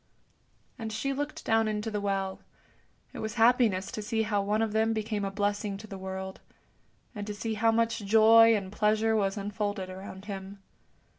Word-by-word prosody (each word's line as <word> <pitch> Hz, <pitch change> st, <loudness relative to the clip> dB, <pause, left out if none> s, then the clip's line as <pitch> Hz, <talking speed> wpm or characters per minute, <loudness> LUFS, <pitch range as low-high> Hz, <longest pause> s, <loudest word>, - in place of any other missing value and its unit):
And 220 Hz, -1 st, -4 dB
she 245 Hz, +6 st, -2 dB
looked 290 Hz, +2 st, -4 dB
down 225 Hz, 0 st, +3 dB
into 215 Hz, +1 st, -2 dB
the 210 Hz, -1 st, -2 dB
well; 195 Hz, -1 st, -2 dB, 0.7 s
it -, -, -7 dB
was 220 Hz, -1 st, -4 dB
happiness 225 Hz, -5 st, +3 dB
to 215 Hz, -, -4 dB
see 220 Hz, +1 st, -1 dB
how 210 Hz, -2 st, 0 dB
one 210 Hz, +2 st, +1 dB
of 220 Hz, -, -1 dB
them 220 Hz, +1 st, +2 dB
became 215 Hz, -1 st, -2 dB
a 195 Hz, -, -1 dB
blessing 205 Hz, 0 st, -1 dB
to 210 Hz, -, -10 dB
the 205 Hz, -2 st, -8 dB
world, 190 Hz, 0 st, -6 dB, 0.7 s
and 205 Hz, -2 st, -6 dB
to 210 Hz, -, -4 dB
see 225 Hz, +1 st, -3 dB
how 225 Hz, +1 st, +3 dB
much 230 Hz, 0 st, +1 dB
joy 225 Hz, +2 st, +6 dB
and 195 Hz, -2 st, -3 dB
pleasure 215 Hz, +1 st, +2 dB
was 195 Hz, -1 st, 0 dB
unfolded 205 Hz, -2 st, -3 dB
around 190 Hz, +1 st, -9 dB
him. 195 Hz, -1 st, -7 dB
210 Hz, 180 wpm, -29 LUFS, 200-225 Hz, 0.7 s, joy